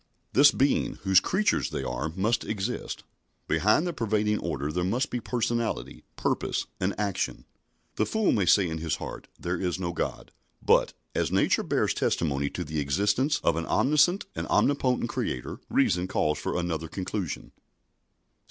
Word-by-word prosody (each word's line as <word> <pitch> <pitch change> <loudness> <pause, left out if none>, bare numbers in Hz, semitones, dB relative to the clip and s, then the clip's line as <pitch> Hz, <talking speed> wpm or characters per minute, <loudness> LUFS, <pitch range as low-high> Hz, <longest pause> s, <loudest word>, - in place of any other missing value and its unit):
This 140 +2 +8
Being, 140 +2 +1
whose 95 -1 +6
creatures 195 - +1
they - - -3
are, 75 - -2
must 105 +5 +1
exist. 110 +3 -4 0.4
Behind 105 - +3
the 175 - -2
pervading 105 -4 0
order 75 -3 -3
there 90 +2 -1
must 115 +9 0
be 125 - -1
personality, 120 -1 -2
purpose, - - -1
and 95 +2 -1
action. 100 -3 -2 0.5
The 110 - +1
fool 220 -2 +2
may 100 -4 +1
say 95 0 +5
in 80 -1 -4
his 80 -3 -1
heart, - - -7
"There 85 0 -2
is 90 -2 -1
no 85 -2 -2
God," - - -4 0.3
but, - - +3 0.2
as - - 0
nature - - +3
bears - - +1
testimony 70 -3 0
to - - -4
the 75 +1 -3
existence 100 - +1
of 85 - +3
an 85 - -3
omniscient 150 +7 +3
and - - -3
omnipotent 130 -3 +2
Creator, 65 - -3
reason 90 +1 +2
calls 75 -4 0
for - - -2
another 80 -2 -2
conclusion. 90 -2 -4
95 Hz, 160 wpm, -27 LUFS, 85-120 Hz, 0.5 s, This